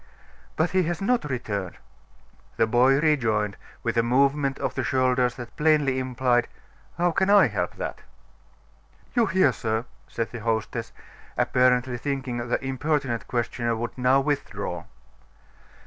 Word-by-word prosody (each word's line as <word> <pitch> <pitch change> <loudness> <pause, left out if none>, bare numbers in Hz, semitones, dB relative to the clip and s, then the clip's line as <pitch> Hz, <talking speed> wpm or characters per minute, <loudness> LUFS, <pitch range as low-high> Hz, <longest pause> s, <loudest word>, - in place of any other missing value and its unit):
"But 160 +2 +1
he 185 -1 +3
has 175 0 -2
not 235 -2 +1
returned." 100 -8 -3 0.8
The - - +4
boy 125 +4 +4
rejoined, 110 - +1 0.3
with - - -1
a - - +6
movement 135 +3 +2
of - - -2
the - - -2
shoulders 130 -2 +1
that 120 -2 -9
plainly 150 -4 +2
implied: 125 -1 +1 0.5
"How 175 0 +2
can 190 +3 +1
I 205 -1 +7
help 100 -7 -2
that?" - - -5 1.1
"You 235 -3 +3
hear, 185 -8 +4
sir," 110 0 -2 0.2
said 115 -1 -3
the 120 - -6
hostess, 115 +1 -2 0.5
apparently 125 -1 +2
thinking 135 -3 -3
the 125 - -1
importunate 135 -2 -1
questioner 120 -1 -1
would 120 +1 -4
now 130 +1 +3
withdraw. 115 -11 -3
130 Hz, 135 wpm, -25 LUFS, 115-145 Hz, 1.1 s, I